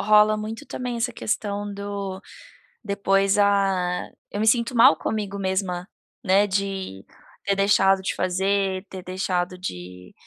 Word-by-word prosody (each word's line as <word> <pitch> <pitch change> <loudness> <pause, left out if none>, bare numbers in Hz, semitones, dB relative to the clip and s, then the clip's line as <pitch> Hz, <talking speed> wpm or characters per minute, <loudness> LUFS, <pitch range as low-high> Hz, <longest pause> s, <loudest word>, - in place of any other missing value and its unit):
rola 215 +1 +5
muito 220 +6 -6
também 250 -1 -4
essa 235 +1 -1
questão 205 -2 -3
do 200 -1 -5 0.6
depois 195 -1 +2
a 195 -3 +2 0.2
eu 205 - -4
me 220 - +1
sinto 235 +2 +2
mal 230 -8 +7
comigo 200 +1 -3
mesma, 190 -1 -2 0.4
né, 195 0 +4
de 190 - -3 0.4
ter 200 0 +1
deixado 195 -1 +4
de 190 - -2
fazer, 190 +1 0
ter 185 -1 -8
deixado 185 -1 -2
de, 90 - -8
195 Hz, 135 wpm, -24 LUFS, 185-205 Hz, 0.6 s, mal